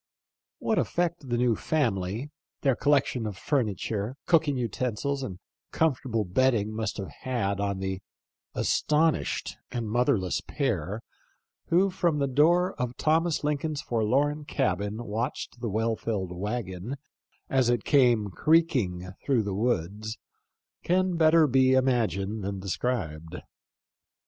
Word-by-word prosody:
What 220 - 0
effect 170 -5 -1
the 120 - +1
new 120 -2 +3
family, 115 - -1 0.3
their 135 -3 +3
collection 135 -5 +1
of 100 -3 -6
furniture, 110 - -1
cooking 160 -5 +3
uten 120 0 -2
sils, 140 +4 -2
and 100 -9 -5 0.3
comfortable 130 -8 0
bedding 110 +1 +2
must 110 -3 -2
have 95 - -5
had 110 -6 -1
on 100 -1 -1
the 95 0 -3 0.5
astonished 155 +1 +1
and 120 -2 -3
motherless 105 -5 +1
pair 110 - -2 0.6
who 185 +3 +3
from 175 -4 +1
the 140 - +1
door 170 +7 +3
of 125 0 -3
Thomas 160 +1 +1
Lincoln's 150 0 -1
forlorn 135 +7 +1
cabin 105 -2 -1
watched 115 +3 -3
the 115 - -2
well 110 +2 0
filled 100 -6 -3
wagon 100 +4 -4 0.5
as 130 -3 +2
it 120 -3 +1
came 120 -8 +3
creaking 120 - +2 0.2
through 130 -6 +2
the 100 -1 -3
woods 110 0 -1 0.7
can 185 0 +2
better 160 0 +5
be 130 -1 +4
imagined, 110 -6 +1
than 100 0 -3
described. 90 -6 -3
120 Hz, 125 wpm, -27 LUFS, 100-145 Hz, 0.7 s, better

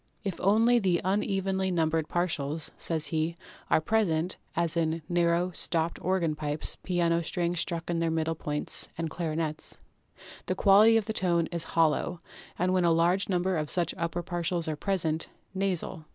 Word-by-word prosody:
"If 195 -4 -4
only 225 +5 +4
the 185 -5 +2
unevenly 190 0 0
numbered 160 -3 +1
partials," 160 -3 -2
says 160 -2 -2
he, 160 +1 -1 0.3
"are - - +4
present 175 -2 0 0.2
(as 170 -1 +1
in 165 -1 0
narrow 175 +1 +1
stopped 165 -1 -1
or 190 +1 +1
gan 165 -3 0
pipes, 150 0 -4
piano 170 -2 +1
strings 170 +1 -1
struck 170 -1 -1
in 170 -1 -1
their 165 0 +1
middle 160 0 0
points, 150 -2 -1
and 165 -1 -3
clarinets), 160 -2 -3 0.7
the 185 - 0
quality 210 +4 +6
of 220 - 0
tone 180 -6 +1
is 170 -2 -1
hollow, 165 +1 +2 0.4
and, 180 +2 +1
when 185 -1 +2
a 170 - +4
large 175 +5 +2
number 185 0 +1
of 150 -2 -2
such 170 -2 +2
upper 170 +1 -3
partials 175 -1 -1
are 155 - -1
present, 165 -2 -1 0.2
nasal. 190 -5 -2
170 Hz, 165 wpm, -28 LUFS, 160-185 Hz, 0.7 s, quality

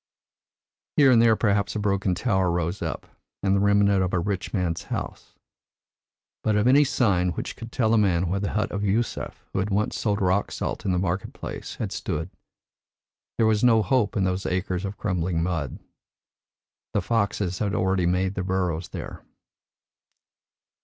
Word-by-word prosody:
Here 140 -3 +7
and 115 -2 +6
there 115 -1 +5
perhaps 100 -1 +1
a - - -1
broken 100 -2 0
tower 95 -2 +1
rose 85 +2 -1
up, 80 -2 -4 0.4
the 100 0 +3
remnant 100 -1 +3
of 90 -1 -1
a - - +2
rich 100 +2 -2
man's 85 -5 -1
house. - - -6 1.1
But 110 - +2
of 105 +1 +2
any 135 +4 +6
sign 95 -10 +1
which - - -5
could 115 0 -9
tell 115 -3 +1
a 115 - +5
man 90 -3 +2
where 95 +3 -1
the 100 - -2
hut 105 - 0
of 100 0 -3
Yusef, 110 +4 -2
who - - 0
had 95 +2 -1
once 105 +1 0
sold 105 -2 0
rock 95 +1 +1
salt - - -4
in 95 - +1
the 90 - +1
market 95 +1 -2
place, - - -7
had - - -4
stood, 80 +4 -3 1.1
there 115 - +3
was 110 0 +2
no 115 -3 +5
hope 125 -6 +1
in 100 - +2
those 95 +1 -1
acres 90 0 -1
of 100 +1 -5
crumbling 90 -3 -1
mud. 85 -7 -2 1.2
The 100 - +3
foxes 100 -4 0
had 100 -2 -1
already 95 -2 +1
made 90 +2 +1
their 95 - -3
burrows 90 -3 -1
there." - - -7
100 Hz, 175 wpm, -25 LUFS, 90-105 Hz, 1.2 s, Here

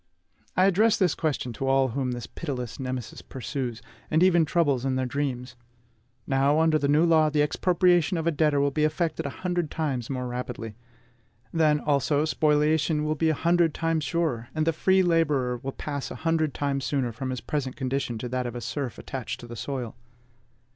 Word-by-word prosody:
I 185 - +5
address 205 +4 +4
this 185 -5 +2
question 140 -6 -2
to 135 +5 -3
all 135 0 +3
whom 130 +2 -2
this 120 -1 -5
pitiless 125 -8 -5
Nemesis 130 -3 -5
pursues, 125 -3 -5 0.3
and 160 +3 +3
even 175 -3 +5
troubles 145 -6 +1
in 135 -1 0
their 130 0 0
dreams. 125 -2 -3 0.7
Now, 140 +3 +2
under 160 -1 +3
the 140 - 0
new 150 +4 +4
law, 160 -2 +4
the 150 -1 +2
expropriation 175 +2 +2
of 165 - -2
a 170 - +3
debtor 150 -2 +2
will 140 0 +2
be 150 +2 0
effected 155 -1 0
a 140 - -8
hundred 175 -3 0
times 135 -8 -2
more 130 -2 -3
rapidly; 120 -3 -5 0.8
then, 155 -2 +3
also, 145 +1 +1
spoliation 155 0 +2
will 155 - +1
be 160 +1 +1
a 155 - +2
hundred 170 0 +2
times 165 -1 0
surer, 135 -5 -1
and 155 0 +1
the 165 - +2
free 190 +4 +3
laborer 150 -8 +1
will 135 +3 -5
pass 145 0 -5
a - - -7
hundred 160 -2 +1
times 140 -1 -1
sooner 130 -4 -1
from 130 +4 -5
his 130 -1 -3
present 135 -2 -3
condition 130 -3 -2
to 120 +2 -5
that 125 0 -2
of 120 - -6
a 120 - -5
serf 130 +2 -4
attached 130 -4 -5
to - - -9
the 120 - -8
soil. 125 -1 -4
145 Hz, 195 wpm, -26 LUFS, 130-160 Hz, 0.8 s, I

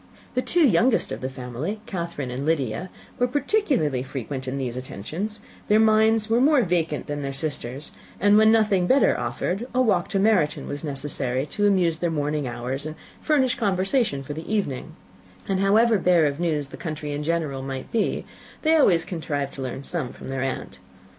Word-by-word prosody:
The 255 - +1
two 340 +4 +3
youngest 230 +4 +3
of - - -5
the 130 - -2
family, 130 - -5
Catherine 170 -8 -4
and 130 +3 -4
Lydia, 155 +2 -1 0.3
were 245 - +3
particularly 265 - +1
frequent 130 0 -5
in 130 +2 -2
these 125 -3 -3
attentions: 160 - -5 0.3
their 210 +1 +5
minds 220 0 +4
were 230 +2 +3
more 285 -2 +5
vacant 165 -4 0
than 145 0 -4
their 135 -1 -4
sisters', 140 -2 -3 0.3
and 205 +2 +5
when 220 +1 +6
nothing 210 -5 +3
better 270 +6 +4
offered, 200 +7 -2
a - - +3
walk 190 -7 +1
to - - 0
Meryton 190 -7 +2
was 145 +3 -5
necessary 140 -3 -2
to 205 -1 +2
amuse 175 -5 +2
their 175 - 0
morning 150 -2 -1
hours 125 +4 -4
and 155 - -6 0.3
furnish 265 -5 +2
conversation 195 - +1
for 145 - -6
the 160 +6 -7
evening; 195 -12 -2 0.5
and, 195 -1 0
however 215 +3 +4
bare 175 -3 +4
of 145 +1 -1
news 155 -5 -1
the - - -9
country 155 -3 -5
in 145 0 -3
general 150 -4 -1
might 135 -1 -6
be, 225 - 0 0.4
they 320 0 +4
always 175 - +4
contrived 145 -5 -3
to 135 - -7
learn 130 +1 -4
some 150 -5 -3
from - - -10
their 135 0 -2
aunt. 135 -1 -4
165 Hz, 185 wpm, -24 LUFS, 140-215 Hz, 0.5 s, when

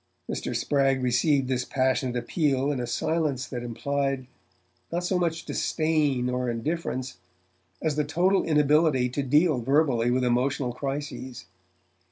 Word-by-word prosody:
Mr. - - -3
Spragg 135 -2 +1
received 130 +2 +2
this 130 -1 0
passionate 130 -1 0
appeal 140 +1 0
in 140 - -2
a 120 - -3
silence 150 0 -1
that 125 -2 -5
implied 135 +2 -2 0.7
not 175 +1 -1
so 180 0 0
much 165 -2 -1
disdain 150 -6 0
or 125 0 -1
indifference, 130 +1 -3 0.7
as 155 -2 0
the 150 - +2
total 180 +6 +2
inability 150 -3 +3
to 135 +3 -2
deal 150 +2 +3
verbally 130 -2 +2
with 125 +1 +1
emotional 125 +1 0
crises. 135 -5 -5
135 Hz, 135 wpm, -26 LUFS, 125-155 Hz, 0.7 s, inability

